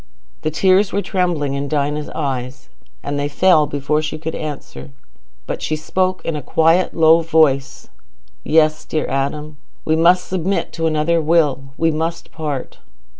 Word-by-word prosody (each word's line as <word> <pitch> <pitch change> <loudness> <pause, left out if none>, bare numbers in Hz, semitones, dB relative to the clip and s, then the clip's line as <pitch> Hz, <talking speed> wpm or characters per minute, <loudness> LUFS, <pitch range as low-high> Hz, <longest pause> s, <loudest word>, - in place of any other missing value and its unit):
The - - -1
tears 190 +5 +3
were 200 +1 -1
trembling 175 -7 -1
in 140 +1 -3
Dinah's 150 0 -1
eyes, 130 -3 -4 0.3
and 145 0 -3
they 145 - 0
fell 155 0 +3
before 145 +2 -1
she 155 0 -4
could 160 +1 -5
answer. 135 - -7 0.6
But - - -5
she 155 - -1
spoke 185 +4 -1
in 165 - -2
a 150 - -4
quiet 165 +6 +2
low 165 0 +5
voice. 155 -5 +1 0.6
"Yes, 155 0 +2
dear 155 - -2
Adam, 145 +3 -3 0.3
we 160 - +2
must 175 +3 +3
submit 190 +1 -2
to 165 -1 -1
another 160 +2 +1
Will. 150 -4 +1
We 165 0 +2
must 165 +2 -3
part." 150 -5 -5
155 Hz, 155 wpm, -19 LUFS, 145-165 Hz, 0.6 s, low